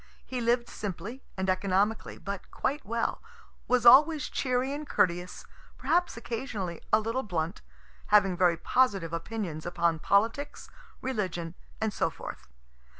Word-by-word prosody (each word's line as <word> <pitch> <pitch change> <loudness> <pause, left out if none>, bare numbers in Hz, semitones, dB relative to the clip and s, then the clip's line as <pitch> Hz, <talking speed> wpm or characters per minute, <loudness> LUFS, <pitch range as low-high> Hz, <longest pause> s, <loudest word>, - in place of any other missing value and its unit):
He 255 -1 -4
lived 235 +1 +2
simply 210 +5 -6 0.2
and 190 0 -1
economically, 195 +3 +1
but 200 -1 -6
quite 285 +2 -2
well 230 +3 -2 0.5
was 245 -1 +2
always 295 +5 +7
cheery 255 +1 0
and 295 0 -6
courteous, 175 0 0 0.3
perhaps 350 -5 +1
occasionally 225 -7 -4
a 215 - +6
little 230 +4 -1
blunt, 170 -7 -3 0.5
having 195 -3 +5
very 175 -2 +3
positive 195 -6 +1
opinions 170 -3 -4
upon 170 -2 0
politics, 225 - 0 0.3
religion, 185 -9 -2 0.3
and 220 -1 -1
so - - +1
forth. - - -9
210 Hz, 130 wpm, -29 LUFS, 180-250 Hz, 0.5 s, always